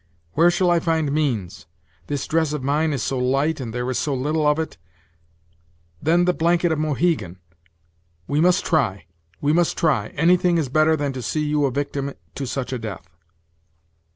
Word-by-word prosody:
Where 170 +3 +5
shall 175 0 +2
I 170 - +4
find 160 -3 0
means? 125 - -2 0.4
This 145 - -2
dress 160 -2 0
of 150 -4 -4
mine 150 +4 +1
is 135 -6 -2
so 135 - -1
light, 135 +5 +1
and 120 -4 -5
there 125 +2 -3
is 125 - -1
so 145 -2 -1
little 150 +4 0
of 150 0 +3
it 160 - -4 1.2
then 170 +3 +3
the 180 - +2
blanket 170 +1 +2
of 160 - 0
Mohegan; 150 - 0 0.9
we 145 +2 +1
must 180 +2 +3
try 135 - 0 0.4
we 145 +1 +2
must 170 0 +1
try 135 -11 +1
anything 175 +2 +3
is 150 -5 -1
better 155 +3 +3
than 145 -2 -2
to 130 - -5
see 155 +5 -2
you 150 -1 +1
a 135 - 0
victim 140 0 -3 0.2
to 140 - -4
such 130 +1 -3
a 125 - -3
death!" 105 -6 -7
150 Hz, 180 wpm, -22 LUFS, 135-160 Hz, 1.2 s, Where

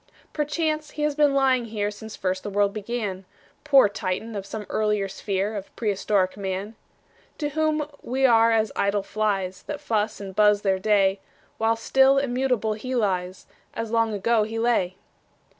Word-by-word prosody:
Perchance 305 0 -1
he 300 - -1
has 300 -1 +1
been 290 -1 +3
lying 260 -3 +3
here 210 -2 -2
Since 220 +1 -9
first 185 0 -2
the - - -5
world 200 0 +1
began, 210 -3 -4 0.4
Poor 275 -6 +6
Titan 200 +3 -4
of 195 -1 -5
some 210 0 -6
earlier 210 -2 0
sphere 195 +2 -2
Of 200 -1 -5
prehistoric 200 -3 0
Man! 195 +2 -4 0.6
To 295 -2 -2
whom 310 0 0
we 265 +2 0
are 230 -2 +5
as 220 -2 +2
idle 200 0 +1
flies, 195 -3 -2
That 295 - -4
fuss 215 -1 -1
and 195 -2 -8
buzz 210 0 +4
their 190 -2 +1
day; 195 -1 +2 0.4
While 225 +1 +2
still 265 +4 +4
immutable 250 -4 0
he 255 +5 -5
lies, 185 -5 -1 0.3
As 225 -1 -4
long 230 -1 +2
ago 215 +2 +2
he 220 +2 -3
lay. 225 -6 +1
215 Hz, 165 wpm, -24 LUFS, 200-250 Hz, 0.6 s, Poor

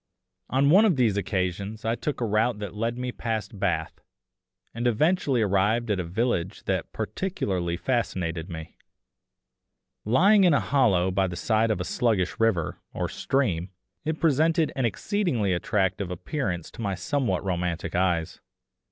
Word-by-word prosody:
On 140 +2 +3
one 195 +6 +7
of 205 -7 +4
these 120 -6 +2
occasions 100 +2 -2
I 115 - +1
took 145 +4 -3
a - - +2
route 110 +2 +1
that 105 -3 -6
led 115 +3 -2
me 125 0 -3
past 110 -4 -4
Bath, 85 -5 -1 0.7
and 120 +2 -1
eventually 140 - +2
arrived 105 +4 +1
at 100 - 0
a - - -1
village 95 0 -1
that 95 -3 -2
particularly 100 - -2
fascinated 90 -9 -2
me. 80 -1 -8 1.3
Lying 195 - +5
in 175 -5 +5
a - - +4
hollow 95 -10 +2
by 95 0 +1
the 90 - -5
side 110 +5 +1
of 105 -5 0
a - - -1
sluggish 100 -1 0
river, 105 -8 +1 0.2
or - - -1
stream, 95 -11 0 0.3
it 160 +1 -2
presented 160 +1 +3
an 130 - 0
exceedingly 120 - 0
attractive 95 0 0
appearance 90 - -3
to - - -9
my 100 -3 -1
somewhat 120 - -1
romantic 90 -2 -2
eyes. 85 -3 0
105 Hz, 150 wpm, -26 LUFS, 90-130 Hz, 1.3 s, one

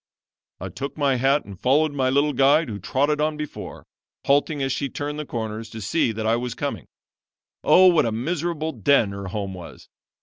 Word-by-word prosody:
"I 95 - -6
took 140 - -6
my 140 -3 +2
hat 135 +3 +2
and 100 -3 -11
followed 150 +4 +2
my 130 -2 +1
little 145 +2 +2
guide 140 +3 +3
who 105 -2 -5
trotted 145 +8 0
on 155 0 0
before, 150 -1 -7 0.4
halting 145 +1 +2
as 135 - -1
she 140 +1 -2
turned 145 +3 -5
the 150 - -5
corners 110 -1 -5
to 110 - -8
see 115 +5 0
that 110 0 -4
I 115 +1 +2
was 120 0 -4
coming. - - -4 0.8
Oh, 185 - +6
what 170 -8 +5
a - - -1
miserable 160 +6 -2
den 140 -10 +2
her 100 0 -6
home 100 0 -4
was! 85 -5 -11
135 Hz, 195 wpm, -23 LUFS, 110-150 Hz, 0.8 s, Oh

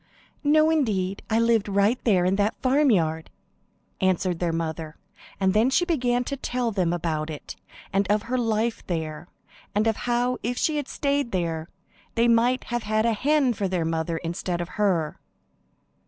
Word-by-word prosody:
"No, 310 +2 +4
indeed; 200 -11 0
I 220 +1 +2
lived 230 -3 +2
right 200 +5 +2
there 190 -6 +3
in 185 +1 +2
that 205 +2 0
farmyard," 215 - +2 0.7
answered 185 -2 +1
their 175 -2 0
mother; 160 -1 -4 0.4
and 190 -1 +2
then 220 +4 +4
she 270 +7 +2
began 250 -8 +1
to 280 - -4
tell 250 -3 -2
them 185 -5 0
about 160 -3 -2
it, 150 -2 -7 0.4
and 195 0 +2
of 210 +1 +1
her 255 +2 -2
life 225 0 0
there, 160 -1 -4 0.5
and 210 +1 +2
of 225 -1 +2
how 245 +1 +1
if 245 +2 -2
she 310 +2 +1
had 290 -2 -3
stayed 280 -3 -1
there 165 -3 -2 0.5
they 230 0 +3
might 240 +2 +3
have 240 0 -3
had 215 +1 0
a 230 - +3
hen 275 +2 +2
for 200 -2 -2
their 180 -3 -1
mother 165 0 -1
instead 170 +1 -3
of 175 0 -4
her. 180 -8 0
210 Hz, 170 wpm, -25 LUFS, 175-245 Hz, 0.7 s, No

